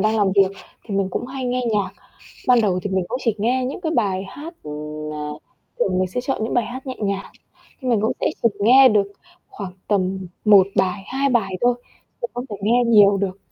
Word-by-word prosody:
đang 215 +2 +2
làm 200 -3 +2
việc 195 -1 +5 0.3
thì 205 - -5
mình 195 -1 +1
cũng - - -3
hay 260 0 -5
nghe 250 0 0
nhạc. 205 -2 0 0.6
Ban 250 -2 +6
đầu 190 -4 +1
thì 205 - -2
mình 190 -2 0
cũng 250 +3 -3
chỉ 230 -3 +1
nghe 250 +4 +1
những 270 +7 -5
cái 320 -3 -1
bài 195 -4 +1
hát, 320 - -9
ưm, 150 0 -6
a 150 0 -4 0.5
thường 185 -1 +1
mình 185 - +1
sẽ 245 +7 -3
chọn 260 -4 -2
những 225 - -2
bài 240 -3 +2
hát 260 +2 -8
nhẹ 255 - -4
nhàng, 200 -2 -2 0.6
nhưng 255 - -2
mình 220 -3 +2
cũng 220 - +1
sẽ - - +3 0.2
chỉ 230 - +6
nghe 255 +6 +7
được 205 -3 +2 0.4
khoảng 195 -3 -7 0.2
tầm 190 -2 0 0.2
1 200 -3 +7
bài, 190 +1 +1
2 275 +3 0
bài 220 -7 +1
thôi, 245 0 +3 0.5
chứ 485 - -1
không 245 +1 -4
thể 205 - -4
nghe 235 +4 +3
nhiều 205 -3 +6
được. 195 -1 -2
210 Hz, 225 wpm, -21 LUFS, 190-245 Hz, 0.6 s, nghe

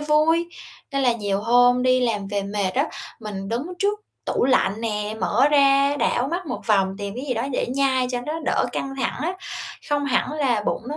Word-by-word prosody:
vui." 310 +3 +2 0.4
Nên 275 - 0
là 245 -2 +4
nhiều 205 -3 -1
hôm 245 +2 +4
đi 255 0 +3
làm 210 -5 -1
về 200 -1 -1
mệt 200 -1 -1
á, - - +2 0.3
mình 195 -2 -6
đứng 235 +3 -1 0.2
trước 415 +1 0 0.2
tủ - - 0
lạnh 225 -5 +2
nè, 210 -1 -2
mở 250 +7 +3
ra 280 0 +4
đảo 260 -1 +1
mắt 350 +1 -3
một 250 - -4
vòng, 195 -3 +2
tìm 200 0 -5
cái 255 - -4
gì 250 - 0
đó 230 - -1
để - - 0
nhai 260 -1 +1
cho 245 -1 -2
nó 305 - -2
đỡ - - +1
căng 270 0 -3
thẳng 265 - -2
á, 345 +3 0 0.6
không 290 -1 +1
hẳn 280 +2 +1
là 260 -8 +1
bụng - - -1
nó 300 - -4
250 Hz, 215 wpm, -23 LUFS, 210-280 Hz, 0.6 s, là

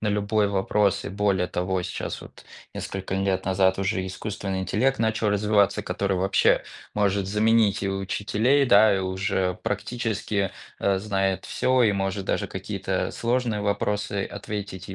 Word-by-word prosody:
на 110 - -2
любой 105 0 +1
вопрос. 100 0 +1
И - - -3
более 100 -2 0
того, 90 +1 -1
сейчас 90 - -5
вот - - -14 0.3
несколько 95 0 -4
лет 95 -1 0
назад, 95 0 +2
уже 95 -1 -1
искусственный 95 0 -4
интеллект 125 +8 +1
начал 110 -1 +1
развиваться, 105 -1 +2
который 100 -1 -1
вообще 95 +2 +3 0.3
может 100 -2 +1
заменить 105 0 +3
и 100 - 0
учителей, 105 +7 +1
да, 110 -3 +6
и 95 - 0
уже 95 0 -1
практически, 110 -4 -2 0.3
э, 100 -1 +1
знает 95 -2 -1
всё, 130 -1 +2
и 110 - +5
может 95 0 -2
даже - - 0
какие-то - - -3
сложные 120 -2 -1
вопросы 100 0 -1
ответить, 100 -3 -6
и 95 - -6
100 Hz, 150 wpm, -25 LUFS, 95-105 Hz, 0.3 s, да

